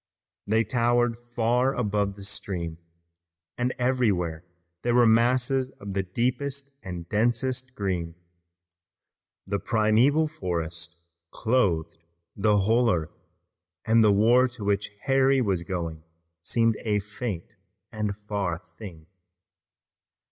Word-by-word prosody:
They 110 +2 +3
towered 120 0 +2
far 120 +2 0
above 105 -4 0
the 100 - -10
stream, 85 -4 -4 0.8
and 125 +1 0
everywhere 105 -11 0 0.4
there 120 0 +1
were 120 -1 +6
masses 125 +3 +3
of 100 -1 -6
the 95 - +1
deepest 130 +8 -2
and 90 -2 -7
densest 125 +5 0
green. 90 -5 -2 1.3
The 100 +1 -2
primeval 115 +10 +3
forest 85 - -5 0.3
clothed 85 -10 0 0.4
the 105 0 +3
whole 115 +4 +3
earth, 80 -4 -2 0.7
and 115 0 +5
the 105 - +6
war 120 +6 +5
to 120 -3 -9
which 100 0 0
Harry 135 0 +3
was 100 -8 +1
going 85 -3 -4 0.4
seemed 115 +5 +1
a 105 -2 0
faint 105 0 -6 0.4
and 105 -2 -3
far 100 -5 -2 0.2
thing. 85 -8 -9
110 Hz, 110 wpm, -26 LUFS, 95-125 Hz, 1.3 s, were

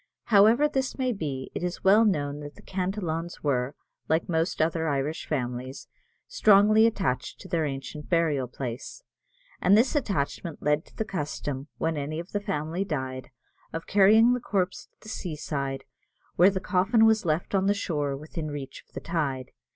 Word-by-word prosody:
However 220 +8 +6
this 265 -3 -2
may 255 -2 0
be, 140 -9 -4
it - - -4
is 180 0 -4
well 205 +4 +6
known 145 -7 0
that 145 0 -9
the - - -16
Cantillons 180 -3 -3
were, 135 -1 0 0.3
like 160 +1 +1
most 165 0 0
other 160 0 +1
Irish 145 +2 -2
families, 130 -2 -4 0.4
strongly 215 - +5
attached 190 - -2
to - - -10
their 165 -3 0
ancient 135 +2 -6
burial 155 -7 +1
place; 125 - -6 0.6
and 195 +3 +5
this 250 +7 +3
attachment 175 - -2
led 150 +1 +1
to - - -21
the 220 - -2
custom, 145 -6 -4
when 160 -1 -1
any 150 +2 -3
of 170 +3 -8
the 205 - -1
family 180 -3 -2
died, 130 -6 -4 0.4
of 165 0 -4
carrying 215 +4 +6
the 250 - 0
corpse 195 -6 -2
to - - -49
the - - -14
seaside, 145 -8 -4 0.5
where 180 +3 +7
the 190 -1 -2
coffin 195 +5 +3
was 220 -1 +4
left 160 +2 -1
on 195 0 +2
the 205 - +3
shore 145 -8 -2
within 155 +1 -6
reach 140 -2 -7
of - - -35
the - - -5
tide. 140 -7 -2
165 Hz, 175 wpm, -27 LUFS, 145-200 Hz, 0.6 s, where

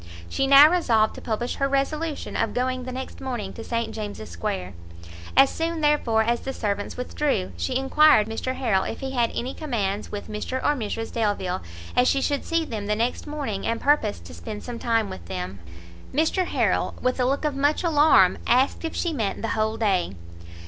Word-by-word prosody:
She 270 - 0
now 280 +2 +9
resolved 240 -11 +2
to - - -10
publish 240 +2 -2
her 275 - +1
resolution 295 +3 -2
of 225 - -1
going 255 0 -1
the 255 - -5
next 260 +1 -7
morning 240 -7 -4
to 225 - -8
St 230 0 -2
James's 205 - -6
square. 90 +2 -4 0.6
As 270 0 +7
soon, 330 0 -2
therefore, 275 -7 +3
as 235 +1 +1
the 270 - -5
servants 205 -3 -3
withdrew, 250 - -1
she 85 0 -1
enquired 270 -4 +5
of 225 - -5
Mr 255 +3 -3
Harrel 220 -8 +1
if - - -5
he 265 0 -3
had 240 -3 +1
any 255 +2 -3
commands 210 -9 -2
with 205 - -5
Mr 215 +5 -3
or 290 - +1
Mrs 225 -2 -4
Delvile, 205 - -1 0.3
as 250 0 +4
she 275 - +3
should 285 +1 -1
see 330 -1 0
them 215 -7 -5
the 210 - +1
next 235 +6 -1
morning, 280 -10 -3
and 230 0 0
purposed 280 - +1
to 85 - -10
spend 85 - -7
some 240 -2 -6
time 225 -2 +1
with 85 - -9
them. 90 +3 -5 0.5
Mr 320 +5 +1
Harrel, - - 0
with 255 +1 0
a 250 - +3
look 275 +4 0
of 295 -2 0
much 285 +4 +1
alarm, 295 - +5
asked 255 +6 +2
if 325 - -4
she 340 -2 -1
meant 220 -7 -2
the 225 - -1
whole 220 0 0
day. 190 - +1
240 Hz, 200 wpm, -24 LUFS, 210-275 Hz, 0.6 s, now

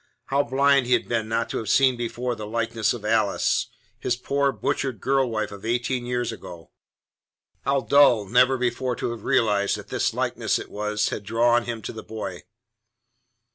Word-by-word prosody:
How 140 +1 +2
blind 140 0 +3
he 125 - +3
had - - +1
been 110 -2 -1
not 115 +1 0
to - - -2
have 110 - -5
seen 130 -2 +4
before 120 +1 -3
the 105 -2 -7
likeness 115 0 0
of 115 -3 -5
Alice 110 -2 +1 0.3
his 120 - 0
poor, 140 +3 0
butchered 135 -5 -2
girl 135 +1 +1
wife 110 -2 -2
of 100 -1 -10
eighteen 120 +2 -1
years 120 -1 -1
ago. 85 -6 -11 0.9
How 140 0 +2
dull 120 -3 +5
never 125 +5 +4
before 125 0 -1
to 120 - -3
have 115 -3 -8
realized 100 -3 +2
that - - -11
that - - 0
likeness - - 0
it - - -8
was 105 0 -1
had - - -4
drawn 120 +3 +2
him 115 -2 -5
to - - -5
the 110 - -7
boy. 100 -5 -7
120 Hz, 180 wpm, -24 LUFS, 110-125 Hz, 0.9 s, dull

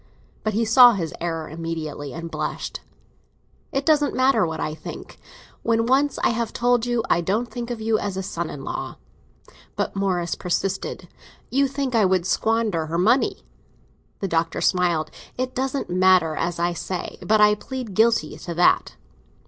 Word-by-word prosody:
But 215 -2 -1
he 230 +1 +2
saw 245 +2 +8
his 170 -6 -3
error 165 -2 -3
immediately, 155 -3 -5
and 165 0 -7
blushed. - - -4 0.9
"It 275 +1 -1
doesn't 300 -2 +3
matter 260 -8 +3
what 160 - -5
I 155 - -2
think, 155 - -9 0.4
when 230 0 +1
once 270 +3 +2
I - - +5
have 230 -1 -2
told 245 0 +2
you 240 -2 0
I 170 - +2
don't 215 +7 -1
think 240 -1 -5
of 240 -2 -4
you 220 0 +1
as 200 -2 -3
a 190 - -2
son 170 -3 -4
in 135 - -7
law." - - -5 0.8
But - - -2
Morris 185 -3 0
persisted. 195 +1 -3 0.4
"You 275 +2 +3
think 275 -1 -3
I 220 -3 +4
would 185 -2 +2
squander 215 -5 0
her 165 +2 -2
money." 225 +9 +2 0.8
The 195 - 0
Doctor 165 -1 0
smiled. 175 -4 +1 0.3
"It 255 0 -2
doesn't 270 +1 -2
matter, 180 -3 +4
as 170 +1 -2
I 175 +1 0
say; 180 +1 -5
but 215 0 +3
I 210 0 +6
plead 245 0 -6
guilty 225 +3 +2
to 170 - -6
that." 175 - +3
200 Hz, 170 wpm, -23 LUFS, 170-240 Hz, 0.9 s, saw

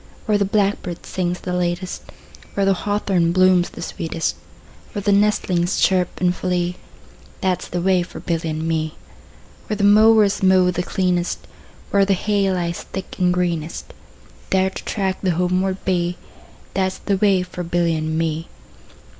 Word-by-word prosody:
Where 210 -2 +2
the 200 - +2
blackbird 195 -4 -1
sings 180 -1 -2
the 180 - -4
latest, 180 +1 -2 0.4
5 - - -21
Where 200 - +2
the 195 - +4
hawthorn 190 -3 0
blooms 185 -1 +4
the - - -8
sweetest, 165 0 -2 0.6
Where 205 - -3
the 205 - +2
nestlings 195 -3 +2
chirp 185 -2 +2
and 180 0 +2
flee, 180 -1 -1 0.6
That 185 -1 +1
's - - -7
the 175 - -3
way 185 -1 +3
for 175 - -7
Billy 165 -2 -2
and 155 +1 -3
me. 160 -1 -1 0.7
Where 210 - -2
the 200 - -1
mowers 210 0 +5
mow 185 -1 +4
the 180 - -2
cleanest, 180 -1 -1 0.5
Where 200 0 +4
the 195 0 +2
hay 200 0 +1
lies 170 -2 -2
thick 190 - -7
and 180 -1 +3
greenest, 170 -3 -2
10 - - -17 0.5
There 190 0 +2
to - - -8
track 190 -3 -2
the 185 - +1
homeward 185 +2 +1
bee, 180 -1 0 0.6
That 190 0 +1
's - - -10
the 200 -2 -1
way 195 -2 +3
for 180 0 -7
Billy 170 -1 +1
and 155 0 -2
me. 165 0 -1
180 Hz, 170 wpm, -21 LUFS, 175-195 Hz, 0.7 s, mowers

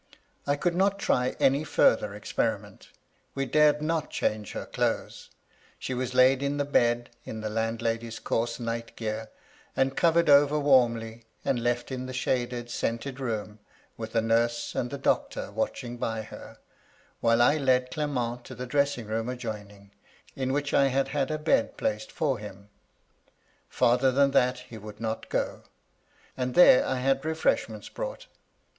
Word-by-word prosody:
I 145 - +3
could 175 +4 0
not 195 +2 +2
try 125 -10 +1
any 140 +3 +3
farther 105 -8 +2
experiment; 105 - -3 0.5
we 135 0 -1
dared 150 +1 +3
not 160 -1 -1
change 105 -2 -2
her - - -5
clothes; - - -2 0.5
she 130 - -4
was 125 0 -3
laid 130 +1 +5
in 140 +1 -1
the 145 - 0
bed 120 -4 +1
in 110 - -7
the 110 0 -3
landlady's 115 +1 -2
coarse 115 +2 -2
night 115 0 -4
gear, 110 0 -4 0.5
and 135 0 +1
covered 170 0 +3
over 145 +1 +6
warmly, 115 -5 +2 0.2
and 125 - +1
left 120 +2 -1
in 130 0 -4
the 130 - -6
shaded, 120 -1 -2
scented 120 +4 -3
room, 110 -4 -4 0.4
with 110 0 -7
a 115 - +4
nurse 115 +1 +1
and 120 - -2
the 140 - -5
doctor - - -1
watching 125 - -3
by 115 -2 -2
her, - - -11 0.6
while 115 0 +3
I 145 +6 +5
led 130 -3 +2
Clement 125 -5 -2
to 130 - -9
the 125 +1 -5
dressing 140 -2 0
room 110 +2 -2
adjoining, 105 -5 -7 0.4
in 130 -1 -1
which 145 +1 -1
I 140 - +5
had 135 +1 0
had 140 -2 -1
a 155 - -1
bed 270 - +1
placed 275 0 -2
for 140 -7 -1
him. 100 -1 -10 1.0
Farther 125 +2 +3
than 140 +1 +3
that 125 -1 +3
he 110 - -8
would 105 0 -10
not 115 0 -4
go; - - -2 0.7
and 125 -1 -3
there 175 -7 +8
I 130 - 0
had 135 +1 +1
refreshments 160 +1 -1
brought. - - -6
125 Hz, 160 wpm, -27 LUFS, 115-140 Hz, 1.0 s, there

